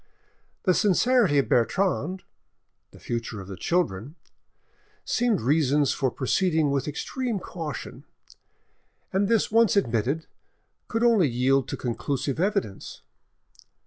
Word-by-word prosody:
The 185 - +3
sincerity 210 - +3
of 140 - +2
Bertrande, 185 +7 0 0.7
the - - -17
future 115 -2 -4
of 95 - -9
the 100 - -7
children, 145 - -1 0.9
seemed 240 -4 +1
reasons 145 +1 +2
for 135 -2 0
proceeding 155 +3 +1
with 140 0 -1
extreme 235 - -3
caution, 165 -6 -7 1.1
and 195 +1 +2
this 225 -1 +1
once 230 -1 +4
admitted, 130 - 0 0.6
could 225 0 -1
only 225 -9 +4
yield 130 +2 +1
to - - -4
conclusive 135 +3 -3
evidence. 165 - -2
155 Hz, 115 wpm, -25 LUFS, 130-200 Hz, 1.1 s, once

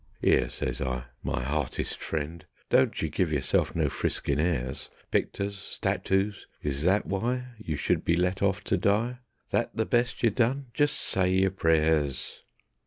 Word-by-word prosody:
"'Ere," - - +4
says 65 0 -3
I, 65 -2 -1 0.2
"my - - -2
hartist 70 0 -2
friend, 80 +1 -3 0.3
Don't - - +4
you - - +1
give 90 -4 0
yerself 70 -4 +1
no - - +2
friskin' 70 0 -1
airs. 75 -7 -1 0.2
Picters, 100 0 0
statoos, 95 0 -1 0.2
is 70 -1 -1
that 95 +3 +3
why 125 +6 -1
You 80 -8 -3
should 70 - 0
be 85 - +3
let 90 +2 0
off 100 0 +1
to - - +1
die? 115 +5 +1 0.3
That - - 0
the 110 - +1
best 120 +2 +1
ye 115 - +5
done? 125 +3 0
Just 145 0 +2
say 95 -1 +1
yer 95 0 +3
prayers." 80 -6 +1
95 Hz, 160 wpm, -28 LUFS, 75-105 Hz, 0.3 s, ye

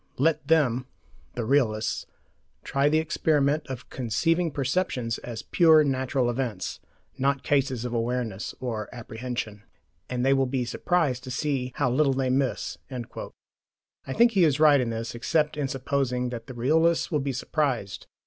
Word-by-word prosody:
"Let 150 +1 +1
them 130 -6 +2 0.5
[the 120 - -2
realists] 110 -5 +1 0.6
try 140 +1 +2
the 155 - +3
experiment 150 -2 +1
of 130 -2 -8
conceiving 165 +8 +1
perceptions 135 -4 -1
as 115 -2 -7
pure 160 -3 +5
natural 130 -2 0
events, 120 -5 -3 0.4
not 135 0 +1
cases 135 -4 +1
of 120 - -4
awareness 115 -3 -2
or 115 -5 -4
apprehension, 115 -2 -5 0.5
and 125 0 -1
they 135 - +5
will 135 -1 +2
be 125 -1 -1
surprised 140 -2 0
to - - -7
see 130 -1 -1
how 130 -4 +1
little 135 +1 +3
they 130 -1 0
miss."* 135 0 -1
I 130 +1 -10
think 235 - +5
he 195 -5 +3
is 150 -3 +3
right 150 -3 +6
in 120 - -1
this, 115 0 -4
except 150 +6 0
in 145 -2 -1
supposing 130 -2 -1
that 115 -2 -7
the 130 - -8
realists 160 +9 +2
will 150 - +2
be 135 0 -2
surprised. 130 - -2
130 Hz, 155 wpm, -26 LUFS, 120-150 Hz, 0.6 s, right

